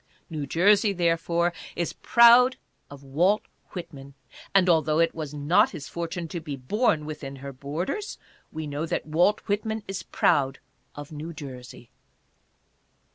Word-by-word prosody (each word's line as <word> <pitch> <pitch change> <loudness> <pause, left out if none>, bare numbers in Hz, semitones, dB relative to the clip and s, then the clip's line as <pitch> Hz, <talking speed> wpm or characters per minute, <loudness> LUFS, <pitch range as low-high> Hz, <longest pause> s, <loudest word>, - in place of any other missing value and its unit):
New 150 -3 -4
Jersey, 200 - +4
therefore, 170 0 +1 0.2
is 170 -1 -2
proud 240 +2 +6 0.3
of 140 -1 -12
Walt 175 +10 +2 0.3
Whitman; 140 -6 -9 0.4
and 195 -2 +4
although 155 -3 +3
it 165 0 +3
was 155 -3 -5
not 150 +3 +3
his 150 -5 -8
fortune 170 0 -4
to 170 - -4
be 150 -3 -6
born 155 - 0
withki 140 -3 -7
her 140 +1 -8
borders, 160 - -4 0.3
we 160 0 -5
know 150 +2 -3
that - - -2
Walt 175 +7 +2
Whitman 215 +1 -2
is 195 -2 -4
proud 135 -4 +1 0.4
of 145 +1 -9
New 155 +2 -7
Jersey. 125 -5 -10
165 Hz, 140 wpm, -26 LUFS, 145-185 Hz, 0.4 s, proud